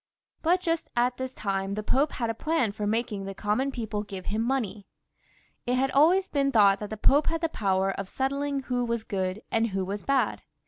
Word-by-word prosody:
But 355 +3 +3
just 330 -2 -1
at 245 +1 +2
this 260 0 -4
time 195 -3 -2
the 215 - -3
Pope 275 +7 +1
had 235 -2 -1
a - - -4
plan 255 -2 0
for 205 0 -3
making 215 -2 -1
the 195 0 -6
common 215 +8 0
people 220 -5 -3
give 195 -3 -8
him 215 +2 -1
money. 225 -5 -2 0.8
It 250 - +2
had 265 +1 +1
always 350 +7 +4
been 275 -1 +1
thought 200 -4 +5
that 210 - -5
the 215 - -5
Pope 285 +7 +4
had 330 -1 0
the 330 - +1
power 195 -6 +1
of 195 0 -5
settling 275 +1 -1
who 250 -1 -1
was 235 -2 -1
good 190 0 -3
and 225 0 +2
who 190 -3 -2
was 200 +2 -4
bad. 275 -1 +1
230 Hz, 215 wpm, -27 LUFS, 205-275 Hz, 0.8 s, thought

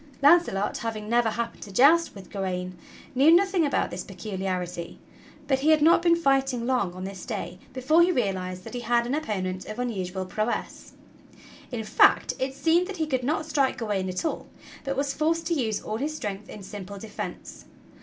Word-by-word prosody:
Launcelot, 285 - +4
having 215 -2 -4
never 235 0 +3
happened 235 +1 -4
to 200 - -9
joust 300 - +5
with 190 -2 -12
Gawain, 185 -2 -3 0.4
knew 275 +4 +5
nothing 360 -1 +4
about - - 0
this 180 - -5
peculiarity, 185 -3 -4 0.5
but 265 -1 +2
he 295 +3 +2
had 310 -1 +5
not 335 +2 +6
been 340 -1 +4
fighting 270 -6 +1
long 240 -9 0
on 185 - -6
this 190 -1 -7
day 175 +2 -5
before 265 +6 +3
he 350 +1 +5
realized 185 - -2
that - - -9
he 245 - -3
had 235 0 +1
an 245 - -2
opponent 190 -11 -3
of 215 - -6
unusual 190 -6 -3
prowess. 215 +5 -3 0.8
In 235 -3 -3
fact 215 - +4
it 265 +1 -2
seemed 335 +5 +2
that 400 -2 -6
he 320 - 0
could 260 -4 -1
not 310 +4 0
strike 280 -4 +1
Gawain 205 -5 -2
at 185 - -3
all, - - -3 0.4
but 275 -1 -3
was 280 0 0
forced 325 +2 0
to 340 - 0
use 225 -9 0
all 215 - -3
his 295 +5 -3
strength 205 -6 -5
in 205 - -9
simple 200 0 -8
defense. 215 +1 -7
235 Hz, 190 wpm, -26 LUFS, 195-290 Hz, 0.8 s, not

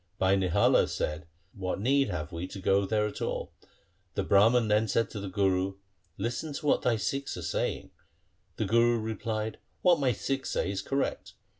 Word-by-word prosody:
Bhai 95 +1 +3
Nihala 95 -3 +3
said, 75 +1 -3
' 90 +3 -40
What 95 -1 -3
need 135 +5 +2
have 75 +2 -4
we 85 +1 -4
to 95 - -8
go 95 +1 +2
there 105 +1 +1
at 105 - -5
all? - - -3 0.3
' - - -41
The - - 0
Brahman 110 +4 +4
then 105 +1 +3
said 115 +2 +1
to 105 - -5
the 100 -1 -5
Guru, 95 0 +1 0.2
' 90 -3 -42
Listen 145 +6 -4
to 150 - -6
what 145 - +3
thy 120 -2 +2
Sikhs 135 +4 -2
are 90 - -6
saying.' 85 - -2 0.6
The - - -1
Guru 115 +1 +3
replied, 110 0 -3
' - - -42
What 175 -3 +5
my 135 -3 +2
Sikhs 135 +4 -2
say - - -1
is 100 - -3
correct. 135 0 -2
105 Hz, 200 wpm, -29 LUFS, 95-120 Hz, 0.6 s, What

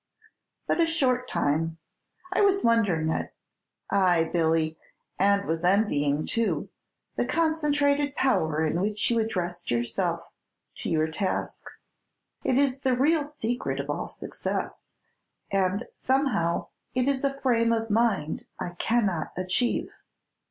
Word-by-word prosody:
"But - - 0
a 330 - +4
short 255 -6 +1
time; 160 +3 0 0.6
I - - +2
was 395 -1 +3
wondering 195 -9 +2
at - - -3 0.6
ay, 175 -4 +3
Billy, 160 -1 +1 0.4
and 200 +1 +3
was 165 +1 -2
envying, 155 -7 +2
too 230 -1 -1 0.5
the - - +2
concentrated 290 -3 +1
power 160 - +1
in 165 +3 0
which 210 +3 +1
you 230 - +2
address 180 -6 -2
yourself 120 0 0 0.6
to - - -4
your 155 -1 +2
task. 170 +4 -3 0.7
It 255 - +2
is 275 -1 +2
the 260 -2 +1
real 300 +4 +3
secret 240 - -3
of 140 +1 -2
all - - -3
success, - - -5 0.6
and 195 +3 +1
somehow 250 - 0 0.3
it 255 +1 +1
is 275 -1 +1
a 275 0 -1
frame 230 -4 +2
of 225 -1 0
mind 205 -9 +1
I - - -3
cannot 190 -3 0
achieve." 185 +7 0
210 Hz, 130 wpm, -27 LUFS, 165-260 Hz, 0.7 s, a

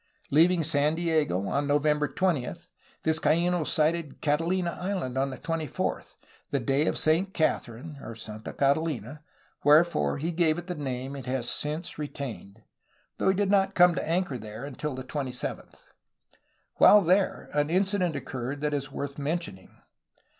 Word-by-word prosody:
Leaving 165 +3 +4
San 150 0 +2
Diego 155 - 0
on 140 +5 0
November 150 +1 +2
20, 165 -9 0 0.5
Vizcaino 170 +2 +2
sighted 155 0 0
Catahna 170 +4 0
Island 180 -9 -3
on 135 +1 +1
the 130 - -7
24th, 160 0 -3 0.3
the 140 - 0
day 135 +5 +1
of - - 0
Saint 175 +5 +2
Catherine 140 -1 -2 0.2
(Santa 110 -1 -8
Catahna), 145 -2 0 0.4
wherefore 150 - +4
he 165 +4 -2
gave 165 -2 +2
it 175 - -6
the 180 - -4
name 135 -3 -4
it 135 -3 -8
has 125 -2 -2
since 155 +5 -2
retained, 120 -8 -7 0.6
though - - +2
he 190 - +3
did 200 0 +1
not 195 -1 +3
come 180 0 +6
to 160 - -3
anchor 170 -7 0
there 110 +4 -8
until 145 0 -5
the 130 - -6
27th. 130 -2 -4 1.0
While 210 - +8
there, 185 +2 +1
ar* 150 - +3
incident 180 +2 +1
occurred 130 +1 -5
that 150 0 0
is 135 -1 -2
worth 140 0 -5
mentioning. 150 - -3
150 Hz, 145 wpm, -27 LUFS, 135-170 Hz, 1.0 s, While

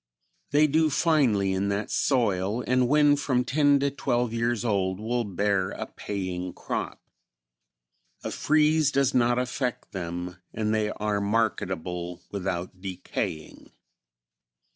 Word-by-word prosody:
They 150 +2 +4
do 155 +1 +3
finely 130 - +2
in 95 +1 0
that 100 +1 -2
soil 110 -3 +1
and 125 0 +2
when 145 +1 +5
from 130 -3 0
ten 145 +1 +3
to 140 0 +1
twelve 120 -3 -1
years 115 0 0
old 95 -3 0
will 120 +3 -1
bear 100 -1 0
a - - -5
paying 90 -3 -5
crop. - - -4 1.2
A - - -3
freeze 155 -1 +3
does 140 -1 +2
not 120 -1 +3
affect 125 0 -2
them 90 0 -5 0.2
and 110 0 0
they 110 -1 +1
are 105 -1 -1
marketable 90 -5 -2
without 90 -2 -4
decaying. 90 -4 -5
110 Hz, 125 wpm, -26 LUFS, 95-130 Hz, 1.2 s, when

